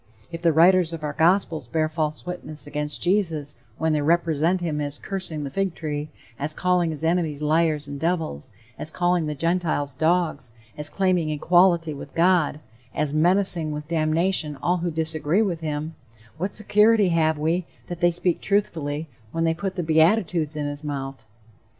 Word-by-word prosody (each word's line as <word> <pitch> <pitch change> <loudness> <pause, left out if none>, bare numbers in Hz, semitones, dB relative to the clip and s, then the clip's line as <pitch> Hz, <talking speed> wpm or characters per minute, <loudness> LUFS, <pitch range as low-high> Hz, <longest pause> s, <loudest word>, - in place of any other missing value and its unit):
If 165 - -6
the 170 -1 +4
writers 170 +1 +4
of 160 -2 -6
our 150 -1 -2
gospels 165 -4 +2
bear 155 +3 0
false 155 -1 -3
witness 175 -4 -5
against 150 0 -3
Jesus 170 -6 0 0.2
when 160 0 +1
they 150 - +1
represent 165 +2 +2
him 155 -4 -2
as 145 0 -3
"cursing 185 -6 -4
the 140 - -5
fig 195 +1 -1
tree," 150 -1 -4 0.3
as 150 +2 -3
calling 180 -2 +1
his 155 -1 -4
enemies 160 -3 0
liars 155 -1 +1
and 140 0 -6
devils, 160 - -2 0.3
as 155 - -1
calling 175 -1 +1
the 150 - -3
Gentiles 165 -3 -1
dogs, 155 -5 0 0.2
as 150 0 -3
claiming 180 -2 +1
equality 170 +1 +3
with 140 - -10
God, 170 -3 +2 0.3
as 150 -1 0
menacing 175 0 +2
with 150 0 -6
damnation 160 0 0
all 175 +6 0
who 175 0 -2
disagree 160 +4 0
with 180 -6 -2
him, 155 0 -4 0.5
what 190 +4 -1
security 210 -1 +3
have 160 -2 +2
we 165 +4 0 0.2
that 175 -1 -7
they 175 - +4
speak 175 0 -1
truthfully 160 -7 -1 0.2
when 165 - -1
they 165 0 +2
put 190 +3 -4
the 175 - -2
beatitudes 160 -1 +2
in 150 -1 -2
his 145 +1 -5
mouth? 135 -5 -5
160 Hz, 170 wpm, -24 LUFS, 150-175 Hz, 0.5 s, the